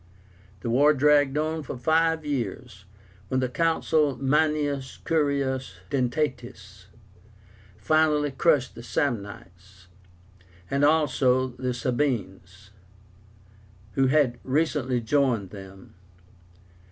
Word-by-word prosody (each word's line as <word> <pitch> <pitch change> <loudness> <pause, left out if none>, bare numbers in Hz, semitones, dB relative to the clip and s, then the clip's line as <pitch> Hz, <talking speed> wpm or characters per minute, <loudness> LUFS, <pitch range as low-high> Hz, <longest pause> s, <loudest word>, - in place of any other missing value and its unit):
The 115 - -4
war 145 +5 +4
dragged 145 0 +3
on 155 +1 -1
for 135 - -7
five 160 +4 +1
years, 125 -6 -5 0.4
when 130 - 0
the 130 - 0
Consul 155 0 +1
MANIUS 145 -1 0
CURIUS 140 -4 -1 0.2
DENTÁTUS 120 - -3 0.9
finally 155 -2 +2
crushed 145 -2 +1
the 115 - -10
Samnites, 100 - -5 0.9
and 140 +1 +1
also 135 -4 +2
the 125 0 -4
SABINES, 105 -7 -3 1.2
who 135 +4 +2
had 130 -4 +2
recently 130 -3 0
joined 115 -6 0
them. 95 -1 -12
130 Hz, 90 wpm, -25 LUFS, 120-150 Hz, 1.2 s, war